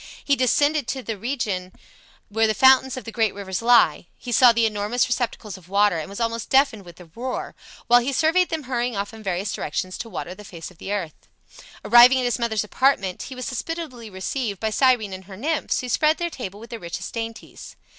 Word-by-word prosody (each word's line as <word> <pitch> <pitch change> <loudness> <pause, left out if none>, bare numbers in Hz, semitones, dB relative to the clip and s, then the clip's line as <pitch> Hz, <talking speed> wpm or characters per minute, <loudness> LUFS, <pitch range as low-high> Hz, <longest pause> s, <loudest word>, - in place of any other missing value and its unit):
He 280 - +3
descended 290 +2 +2
to 265 -2 -3
the 225 - -4
region 205 -5 -3 0.6
where 220 +2 +1
the 215 - 0
fountains 265 -1 +5
of 255 - -6
the 230 - -8
great 225 -3 0
rivers 190 -1 -4
lie; 230 -9 +4
he 245 - -8
saw 245 +1 +7
the 230 0 +2
enormous 215 +3 0
receptacles 225 -5 -3
of 180 -1 -20
waters 200 -4 +2
and 155 - -8
was 200 - -8
almost 230 -1 -2
deafened 265 -7 +2
with 175 -1 -12
the 170 -2 -15
roar, 255 +2 -5 0.3
while 245 0 +6
he 245 +3 -2
surveyed 325 +6 +2
them 320 -2 -3
hurrying 245 -2 -2
off 200 +2 -3
in 220 - -11
various 195 0 -2
directions 185 +5 -4
to 230 - -6
water 180 - -6
the 210 - -12
face 170 -3 -9
of 180 - -22
the 195 - -6
earth. 185 -7 -5 0.6
Arriving 240 +3 +8
at 255 - 0
his 245 0 0
mother's 220 -3 0
apartment, 210 -5 +1
he 260 - -8
was 255 -1 -5
hospitably 260 -3 -5
received 200 +2 -4
by 220 -1 -1
Cyrene 240 -5 +2
and 190 0 -9
her 190 0 -11
nymphs, 305 +6 -1
who 250 - -6
spread 305 +6 +2
their 345 -1 -3
table 205 -8 -7
with 230 +1 -12
the 230 - -6
richest 170 -3 -6
dainties. 230 -1 -7
230 Hz, 215 wpm, -23 LUFS, 200-255 Hz, 0.6 s, Arriving